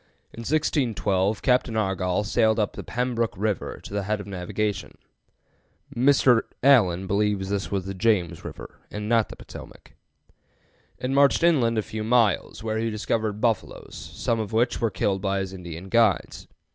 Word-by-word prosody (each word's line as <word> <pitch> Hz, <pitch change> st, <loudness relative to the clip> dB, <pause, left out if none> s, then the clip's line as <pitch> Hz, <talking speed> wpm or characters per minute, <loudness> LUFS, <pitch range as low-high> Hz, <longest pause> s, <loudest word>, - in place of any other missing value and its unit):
In -, -, -10 dB
1612 115 Hz, -, 0 dB
Captain 125 Hz, -3 st, +2 dB
Argoll 95 Hz, -2 st, 0 dB
sailed 110 Hz, 0 st, +2 dB
up 105 Hz, -2 st, 0 dB
the -, -, -7 dB
"Pembrook 120 Hz, -1 st, -1 dB
River" 105 Hz, -1 st, -2 dB
to -, -, -9 dB
the 100 Hz, -, 0 dB
head 105 Hz, +2 st, -2 dB
of 100 Hz, -, -7 dB
navigation 100 Hz, +2 st, -3 dB, 1.0 s
(Mr. 125 Hz, -2 st, +4 dB, 0.2 s
Allen 95 Hz, -10 st, +4 dB
believes 100 Hz, 0 st, 0 dB
this 100 Hz, -1 st, -2 dB
was 95 Hz, -2 st, -2 dB
the 95 Hz, -, -4 dB
James 95 Hz, -5 st, 0 dB
River, -, -, -9 dB
and 105 Hz, 0 st, -5 dB
not 115 Hz, -1 st, +2 dB
the -, -, -9 dB
Potomac) -, -, -12 dB, 1.0 s
and 130 Hz, +1 st, -3 dB
marched 140 Hz, +4 st, +4 dB
inland 130 Hz, -10 st, +3 dB
a 110 Hz, -, +1 dB
few 110 Hz, +1 st, -5 dB
miles, 110 Hz, -3 st, +1 dB
where 110 Hz, 0 st, -1 dB
he 115 Hz, 0 st, -1 dB
discovered 110 Hz, -1 st, -2 dB
buffaloes, 115 Hz, -1 st, -2 dB, 0.2 s
some 115 Hz, -1 st, 0 dB
of 110 Hz, -2 st, -4 dB
which 120 Hz, +4 st, +1 dB
were 115 Hz, -, +2 dB
killed 95 Hz, -1 st, -1 dB
by 100 Hz, 0 st, 0 dB
his 95 Hz, -1 st, -3 dB
Indian 90 Hz, -1 st, -8 dB
guides. 115 Hz, -2 st, +1 dB
110 Hz, 160 wpm, -25 LUFS, 95-115 Hz, 1.0 s, Mr